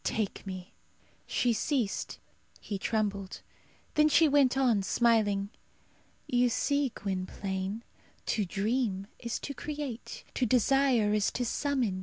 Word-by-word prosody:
Take 210 -2 -2
me." 185 -1 -7 0.5
She 245 -1 +2
ceased; 230 -2 -1 0.4
he 200 -2 -5
trembled. 200 -3 -2 0.5
Then 305 0 +5
she 320 +2 +6
went 275 -3 +4
on, 245 -6 +3
smiling, 205 -2 +2 0.7
"You 245 0 +3
see, 280 +2 +1
Gwynplaine, 190 +2 -3 0.4
to 215 - +1
dream 200 +1 -1
is 235 -1 -3
to 280 - -4
create; 285 -5 -6
to 250 - +1
desire 250 -2 +3
is 210 -1 +2
to 245 - -1
summon. 245 -7 0
230 Hz, 120 wpm, -30 LUFS, 200-265 Hz, 0.7 s, she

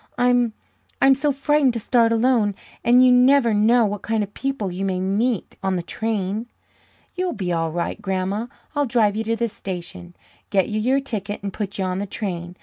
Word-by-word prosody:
"I'm 245 -2 +2 0.5
I'm 270 - +6
so 280 +2 +1
frightened 280 -1 +2
to 230 - -2
start 230 +1 +2
alone. 230 -3 +2 0.3
And 250 +2 +6
you 250 - +6
never 250 -1 +5
know 225 +3 +4
what 205 -1 -3
kind 220 -1 0
of 205 0 -8
people 270 -8 -3
you 185 +2 -4
may 190 -2 -1
meet 205 +4 -1
on 190 -1 0
the 175 - -2
train." 215 +2 -2 0.7
"You'll 360 0 -2
be 185 -5 -2
all 165 -1 -1
right, 170 +1 -3
Grandma. 195 +4 -2 0.3
I'll 290 -1 +1
drive 220 -4 +2
you 220 - -1
to 230 +1 0
the 235 +1 0
station, 180 -3 -8 0.3
get 190 -3 +1
you 215 0 -1
your 265 +5 +2
ticket, 210 -6 -5
and 200 -1 -4
put 200 -2 -4
you 190 - -1
on 185 0 -2
the 200 - -3
train. 180 -4 -5
215 Hz, 200 wpm, -22 LUFS, 190-245 Hz, 0.7 s, I'm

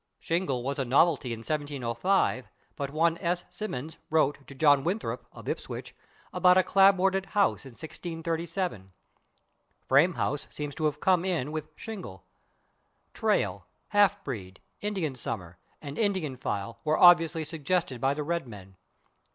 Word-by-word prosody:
/Shingle/ 165 -8 -1
was 140 +2 -2
a - - +2
novelty 135 0 +3
in 115 -1 -5
1705, 140 - 0 0.3
but 140 -1 -3
one 165 +3 +1
S. 175 +1 -1
Symonds 160 -6 -5
wrote 145 -3 +1
to 140 - -11
John 145 -1 +5
Winthrop, 190 +6 -3
of - - -12
Ipswich, - - -5 0.4
about 180 0 +5
a 185 - +5
/clapboarded/ 195 0 +4
house 200 -6 +2
in 130 - -12
1637. 165 - -4 0.9
/Frame 155 +7 +4
house/ 145 - -2
seems 145 -1 -5
to 155 - -2
have 150 -1 0
come 185 -2 +3
in 170 -7 -1
with 155 0 -6
/shingle/. 185 - -8 0.9
/Trail/, 95 -1 0 0.3
/half 205 -3 +5
breed/, 95 -8 -6 0.2
/Indian 190 -9 -2
summer/ 90 -7 -5 0.2
and 140 -1 -6
[Pg047] - - +2
/Indian 150 -8 -4
file/ 105 +1 -3
were 155 0 +2
obviously 165 -2 +6
suggested 160 -4 -2
by 135 +1 +2
the 150 - -3
Red 170 -2 -2
Men. 95 -4 -12
155 Hz, 145 wpm, -28 LUFS, 130-175 Hz, 0.9 s, obviously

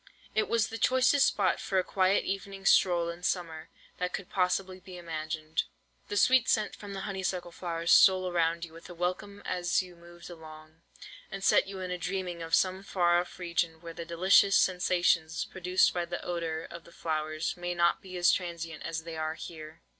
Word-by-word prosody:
It 215 - 0
was 230 -2 +1
the 225 - -6
choicest 260 +2 +4
spot 195 -3 +1
for 195 - -2
a 185 - +3
quiet 190 +1 +2
evening 195 0 -5
stroll 175 -3 +4
in 170 +1 -7
summer 165 -3 -3 0.3
that 180 0 -2
could 195 - -6
possibly 185 0 0
be 185 -1 -11
imagined. 155 -2 -3 0.5
The 205 - -3
sweet 250 +4 +4
scent 215 -1 +1
from 205 -1 -9
the 195 - -5
honeysuckle 190 -3 -3
flowers 170 -1 -2
stole 185 -1 +6
around 170 -1 0
you 160 - -16
with 165 +2 -13
a 175 - -9
welcome 185 +4 -3
as 180 +1 0
you 180 -1 -13
moved 170 0 -14
along, 155 -1 -13 0.5
and 195 0 -7
set - - +4
you 195 -1 -7
a 180 -1 -3
dreaming 180 -1 -3
of 165 +1 +1
some 185 +1 +1
far 175 -3 +2
off 175 - -6
region 170 -2 -2
where 165 0 -9
the 170 - -6
delicious 185 +4 +4
sensations 175 -3 +2
produced 185 0 +1
by 175 -1 -1
the 175 0 -6
odour 165 -2 -3
of 170 0 -11
flowers 155 0 -2
may 175 0 -4
not 170 0 +2
be 185 -1 -8
as 175 0 +5
transient 170 -3 -4
as 160 -1 -4
they 165 0 -7
are 155 0 -2
here. 160 0 -10
175 Hz, 190 wpm, -29 LUFS, 165-190 Hz, 0.5 s, stole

